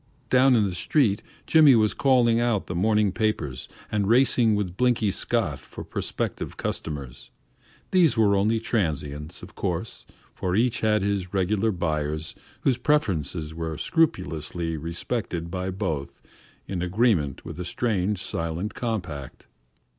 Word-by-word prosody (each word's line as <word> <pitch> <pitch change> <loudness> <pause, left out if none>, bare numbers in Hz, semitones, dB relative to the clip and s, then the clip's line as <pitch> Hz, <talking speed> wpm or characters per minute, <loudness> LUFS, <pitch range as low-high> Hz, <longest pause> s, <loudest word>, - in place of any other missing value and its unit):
Down 130 0 +6
in 110 -3 +3
the 95 - -4
street, 105 - +1 0.2
Jimmy 155 -5 +7
was 110 -2 +3
calling 120 -4 +3
out 120 -4 +1
the - - -5
morning 105 +3 +2
papers 95 - -2 0.2
and 105 -2 0
racing 120 -1 +4
with 95 -4 -2
Blinky 120 -4 +2
Scott 95 - -1
for 65 - -10
prospective - - -3
customers; 70 -6 -5 0.6
these 175 -9 +4
were 105 -3 +4
only 110 +3 +2
transients, 75 - -2
of - - -11
course, - - -4 0.3
for 90 0 -2
each 125 +2 +2
had 105 -2 +2
his 100 -2 -2
regular 100 +4 +1
buyers 75 -3 -2 0.3
whose 130 -3 +2
preferences 90 - 0
were 80 -1 -4
scrupulously 85 - 0
respected 85 +2 -4
by 95 +1 -2
both 80 -7 -4 0.4
in 90 -3 -3
agreement 90 - +1
with - - -7
a - - -2
strange 100 0 -1
silent 85 +3 -3
compact. 90 - -4
100 Hz, 135 wpm, -25 LUFS, 85-115 Hz, 0.6 s, Jimmy